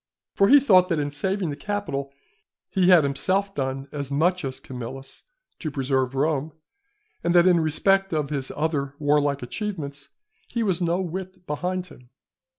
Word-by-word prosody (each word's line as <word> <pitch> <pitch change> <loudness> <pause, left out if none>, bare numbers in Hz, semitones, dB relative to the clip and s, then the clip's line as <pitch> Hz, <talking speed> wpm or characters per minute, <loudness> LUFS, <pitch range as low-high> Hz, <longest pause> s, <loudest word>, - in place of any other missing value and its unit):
For 195 - +4
he 285 +5 +8
thought 185 -9 +5
that 165 - +1
in 145 -1 -1
saving 185 +3 -1
the - - -4
Capitol, 145 -7 -3 0.6
he 185 -2 +3
had 175 -4 +7
himself 190 +8 0
done 135 -1 -3
as 140 -2 -4
much 175 +6 +1
as 135 -1 -4
Camillus 130 +1 -8 0.3
to 155 - -3
preserve 135 -2 -1
Rome, 150 +1 0 0.7
and 170 - +1
that 175 0 +7
in 180 -2 +5
respect 195 +5 +2
of 150 -3 -1
his 135 -3 -3
other 145 -3 -1
warlike 145 -2 +1
achievements 145 - -5 0.4
he 235 - -2
was 190 -4 0
no 170 +1 +1
whit 185 +1 -6
behind 180 +4 -2
him. 125 -8 -16
155 Hz, 160 wpm, -24 LUFS, 140-185 Hz, 0.7 s, he